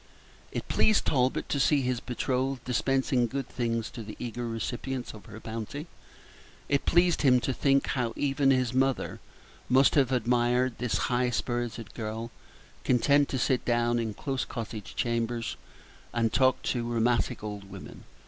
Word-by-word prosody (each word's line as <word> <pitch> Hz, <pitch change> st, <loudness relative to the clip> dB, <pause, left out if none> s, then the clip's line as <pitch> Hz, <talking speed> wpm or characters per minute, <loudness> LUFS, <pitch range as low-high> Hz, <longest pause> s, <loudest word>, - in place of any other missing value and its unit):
It -, -, -4 dB
pleased 215 Hz, -2 st, +3 dB
Talbot 130 Hz, -2 st, +1 dB
to 140 Hz, -, 0 dB
see 140 Hz, +1 st, +4 dB
his 125 Hz, -1 st, 0 dB
betrothed 130 Hz, +1 st, -2 dB
dispensing 130 Hz, 0 st, +1 dB
good 135 Hz, +2 st, -4 dB
things 115 Hz, -2 st, -2 dB
to 120 Hz, -, -7 dB
the 105 Hz, -1 st, -8 dB
eager 120 Hz, 0 st, -4 dB
recipients 120 Hz, +3 st, -4 dB
of 105 Hz, -4 st, -13 dB
her 110 Hz, -, -9 dB
bounty. 115 Hz, +7 st, -5 dB, 0.8 s
It 140 Hz, -1 st, 0 dB
pleased 175 Hz, -1 st, +4 dB
him 125 Hz, -3 st, +5 dB
to 130 Hz, -, -1 dB
think 140 Hz, +1 st, +2 dB
how 125 Hz, -3 st, -1 dB
even 140 Hz, -1 st, +2 dB
his 130 Hz, -2 st, +2 dB
mother 130 Hz, 0 st, 0 dB, 0.5 s
must 130 Hz, +2 st, +5 dB
have 135 Hz, -3 st, +3 dB
admired 125 Hz, 0 st, +1 dB
this 125 Hz, -1 st, 0 dB
high 125 Hz, 0 st, +2 dB
spirited 120 Hz, -1 st, -3 dB
girl, 115 Hz, +1 st, -5 dB, 0.5 s
content 140 Hz, +3 st, +3 dB
to 130 Hz, -, -1 dB
sit 125 Hz, +1 st, +1 dB
down 120 Hz, 0 st, +1 dB
in 110 Hz, -3 st, -3 dB
close 135 Hz, -2 st, -2 dB
cottage 110 Hz, -4 st, -6 dB
chambers 115 Hz, 0 st, -1 dB, 0.6 s
and 115 Hz, -1 st, +1 dB
talk 130 Hz, -1 st, +3 dB
to 120 Hz, -2 st, -1 dB
rheumatic 120 Hz, 0 st, +1 dB
old 105 Hz, -2 st, -6 dB
women. 95 Hz, -1 st, -10 dB
125 Hz, 155 wpm, -28 LUFS, 115-135 Hz, 0.8 s, him